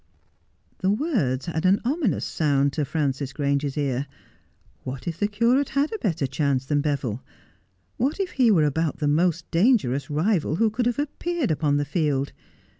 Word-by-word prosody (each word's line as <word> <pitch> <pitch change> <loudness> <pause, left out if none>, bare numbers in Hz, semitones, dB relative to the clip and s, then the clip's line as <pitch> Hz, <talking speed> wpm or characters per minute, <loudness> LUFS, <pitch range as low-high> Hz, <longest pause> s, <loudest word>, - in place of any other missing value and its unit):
The 190 - +1
words 205 - 0
had 165 -1 -3
an 190 +2 +4
ominous 275 - 0
sound 140 -2 +1
to 150 -1 -1
Frances 135 -2 -2
Grange's 140 0 -1
ear. 140 -1 -1 0.8
What 130 +3 -6
if 165 0 -4
the 205 - +2
curate 235 +6 +2
had 280 +6 0
a 440 - -3
better 165 - -1
chance 135 -1 0
than 145 +1 +1
Beville? 135 -6 -2 0.8
What 275 - 0
if 380 -2 -1
he 255 -3 +3
were 170 -8 +4
about 155 +1 0
the 150 - -1
most 165 +3 +1
dangerous 165 - +2
rival 155 +1 +1
who 220 +4 +2
could 240 +2 0
have 245 - 0
appeared 300 - -2
upon 150 -2 +1
the 145 - 0
field? 145 -3 -1
160 Hz, 170 wpm, -24 LUFS, 140-220 Hz, 0.8 s, an